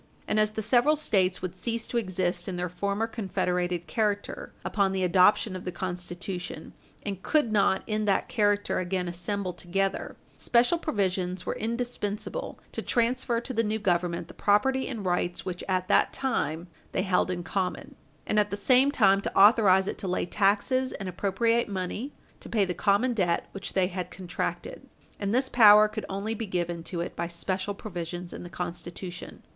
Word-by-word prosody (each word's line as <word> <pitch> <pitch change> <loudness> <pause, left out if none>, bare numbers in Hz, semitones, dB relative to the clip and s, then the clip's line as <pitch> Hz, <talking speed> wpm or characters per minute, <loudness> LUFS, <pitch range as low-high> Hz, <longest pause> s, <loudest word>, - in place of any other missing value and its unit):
And 215 - +1
as 215 0 +2
the 220 - -3
several 250 +7 +4
States 190 -12 +1
would 185 -1 -4
cease 230 +4 -3
to 240 - -3
exist 185 -4 -1
in 185 - -3
their 180 0 -2
former 200 +4 -1
confederated 180 -5 -1
character 205 +4 -2
upon 195 -2 +1
the 190 -1 0
adoption 185 +2 +4
of 185 - -6
the 180 - -3
Constitution, 175 -1 -5 0.3
and 195 -2 -4
could 295 -4 +2
not, 200 -2 +3
in 215 -1 -1
that 195 -2 +1
character, 205 -2 +1
again 180 0 -2
assemble 180 +2 -3
together, 195 +3 -2 0.2
special 245 +8 +3
provisions 185 - -1
were - - -1
indispensable 235 - -3
to - - -4
transfer 240 0 +1
to 255 - -5
the 230 -1 +1
new 215 0 0
Government 175 -4 0
the - - -12
property 260 +6 +2
and 225 -7 -5
rights 175 0 -1
which 180 -1 -4
at 185 -1 0
that - - +4
time 175 - -2 0.3
they 185 - +1
held 185 -2 +2
in 175 -1 -3
common, 185 0 -3 0.3
and 210 - +2
at 210 0 +2
the 200 - -3
same 255 +6 +4
time 195 -8 +4
to - - -4
authorize 195 -2 +6
it - - -4
to 195 - -3
lay 180 - 0
taxes 210 +8 +1
and 195 -2 -5
appropriate 205 +6 +1
money 200 +8 -3 0.3
to - - -10
pay 210 -4 +2
the 180 - -2
common 205 +7 +2
debt 180 -6 0
which 195 0 -6
they 190 -1 +3
had 180 -1 -4
contracted; 190 - -5 0.3
and 200 -1 -1
this 260 +3 +2
power 215 -3 +8
could 215 0 -6
only 200 +3 -2
be 225 0 -4
given 175 -2 -2
to 170 +1 -4
it 170 - -5
by 170 - -2
special 185 +3 -3
provisions 175 -3 -6
in - - -7
the 175 - -8
Constitution. 175 +1 -7
195 Hz, 180 wpm, -27 LUFS, 180-220 Hz, 0.3 s, power